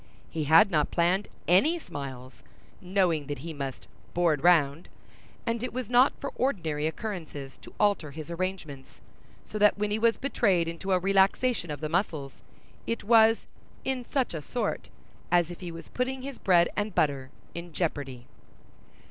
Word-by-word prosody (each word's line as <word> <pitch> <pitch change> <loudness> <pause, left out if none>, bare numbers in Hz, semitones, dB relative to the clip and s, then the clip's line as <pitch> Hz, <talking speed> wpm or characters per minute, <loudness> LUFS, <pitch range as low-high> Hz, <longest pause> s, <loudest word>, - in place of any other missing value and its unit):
He 155 -2 -2
had 165 +7 +6
not 150 -3 +2
planned 180 +4 +1 0.2
any 275 - +4
smiles 135 - -8 0.4
(knowing 180 -6 +1
that 145 -1 -3
he 165 - -5
must 140 -3 -6 0.3
"board 170 -5 +2
round"), 165 -3 +3 0.6
and 230 -1 -1
it 250 - -4
was 250 -2 -4
not 250 +3 +6
for 275 - -4
ordinary 165 - 0
occurrences 160 - -6
to - - -14
alter 200 -7 +2
his 155 +3 -8
arrangements; 170 -6 -5 0.5
so 215 - -5
that 210 0 +5
when 205 0 -1
he 215 - 0
was 230 0 +3
betrayed 195 -11 +1
into 170 +4 -4
a 185 - +5
relaxation 195 +2 +2
of 145 -1 -5
the 155 - -1
muscles, 155 -5 -1 0.5
it 230 - -2
was 225 0 +5 0.4
"in 260 -2 -1
such 265 -8 0
a 160 - -4
sort" 245 - -3 0.4
as 175 -1 +3
if 175 - -9
he 175 -2 -6
was 165 0 -9
putting 255 +1 -2
his 275 -1 -7
bread 175 -2 +4
and 205 -2 -2
butter 140 -3 +1 0.2
in 170 0 -7
jeopardy. 145 -7 -3
175 Hz, 165 wpm, -28 LUFS, 155-215 Hz, 0.6 s, had